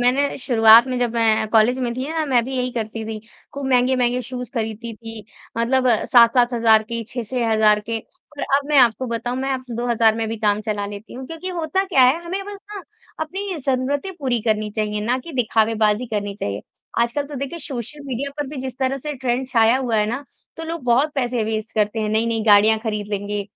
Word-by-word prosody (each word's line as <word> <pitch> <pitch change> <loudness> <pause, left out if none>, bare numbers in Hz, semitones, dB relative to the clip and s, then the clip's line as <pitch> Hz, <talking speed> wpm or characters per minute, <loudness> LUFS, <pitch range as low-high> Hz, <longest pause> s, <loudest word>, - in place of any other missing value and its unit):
मैंने 265 +4 +2
शुरुआत 230 -2 +6
में 255 -1 -2
जब 240 -1 -1
मैं 220 -1 +2
कॉलेज 225 +3 +3
में 245 -2 -1
थी 260 +3 -4
ना 320 0 -1
मैं 245 -4 +2
भी 265 +1 -4
यही 250 0 -1
करती 225 -1 -4
थी, 220 -1 -6 0.3
खूब 280 -1 -5
महँगे-महँगे 250 -1 +2
शूज़ 250 0 -7
ख़रीदती 225 0 -4
थी। 225 0 -9 0.3
मतलब 255 +2 +2 0.2
7-7 240 +1 +5
हज़ार 225 -2 +5
के, 230 +1 -5
6-6 240 0 -3
हज़ार 215 -1 +4
के 230 0 -2 0.4
और - - -3
अब 280 0 -3
मैं 300 - +2
आपको 245 +1 +4
बताऊँ 235 +1 -3
मैं 265 +1 -2
अब 260 -1 -4
में 230 - -4
2000 230 -2 +2
भी 225 +1 -4
काम 210 -1 +1
चला 210 -1 -3
लेती 205 +2 -9
हूँ 260 +1 -7
क्योंकि 330 +4 -7
होता 350 +1 -1
क्या 350 -9 +3
है 275 +7 +3
हमें 375 +3 -3
बस 405 0 -8 0.2
ना 400 - -6 0.4
अपनी 380 +4 -4
ज़रूरतें 275 +5 -1
पूरी 255 -4 0
करनी 215 -2 0
चाहिए 210 -1 -1
ना 245 +3 +1
कि 325 +6 -10
दिखावे 225 -3 +1
बाज़ी 210 +4 +1
करनी 205 -3 -3
चाहिए। 100 - -4 0.4
आजकल 235 +5 0
तो 290 - -9
देखिए 280 +5 -5
सोशल 280 -1 -5
मीडिया 270 +2 -3
पर 290 - -2
भी 285 +2 -8
जिस 260 -2 -6
तरह 265 0 0
से 300 +3 -5
ट्रेंड 255 -1 -2
छाया 230 -1 +4
हुआ 250 -4 -1
है 210 0 +2
ना 245 +6 -4 0.3
तो 325 - -6
लोग 330 -1 -5
बहुत 255 +5 +2
पैसे 245 -4 -1
वेस्ट 220 0 -3
करते 215 +1 0
हैं। 215 - -1
नहीं-नहीं 225 +1 0
गाड़ियाँ 215 +1 +6
ख़रीद 210 -2 -3
लेंगे, 205 0 -2
240 Hz, 215 wpm, -21 LUFS, 220-265 Hz, 0.4 s, शुरुआत